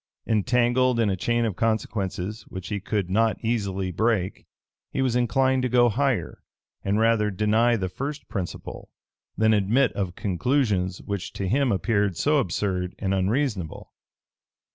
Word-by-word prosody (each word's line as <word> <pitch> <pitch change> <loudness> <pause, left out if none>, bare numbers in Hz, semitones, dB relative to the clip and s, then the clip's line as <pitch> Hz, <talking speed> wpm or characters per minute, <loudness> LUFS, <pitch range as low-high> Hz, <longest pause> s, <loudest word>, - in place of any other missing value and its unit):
Entangled 120 +3 +2
in 110 -3 +2
a - - 0
chain 120 +5 0
of 105 -5 -2
consequences 105 -2 -2
which 95 -1 -7
he 105 - -2
could 100 -1 -2
not 110 +4 +2
easily 100 -5 -1
break, 100 0 -1 0.4
he - - -4
was 130 -3 +1
inclined 130 +2 +2
to 125 - 0
go 120 0 +5
higher, 135 +2 -1 0.4
and 100 +2 +1
rather 110 -2 +3
deny 110 +4 +2
the 95 -4 -1
first 140 +10 -5
principle, 95 -4 -6 0.5
than 110 0 +4
admit 110 +6 +3
of 95 -3 -3
conclusions 100 - 0
which 100 -3 -4
to 95 - -3
him 130 +5 +2
appeared 100 -2 +1
so 150 0 +3
absurd 90 -4 -2
and 95 -2 -1
unreasonable. 95 - -1
110 Hz, 145 wpm, -25 LUFS, 95-120 Hz, 0.5 s, go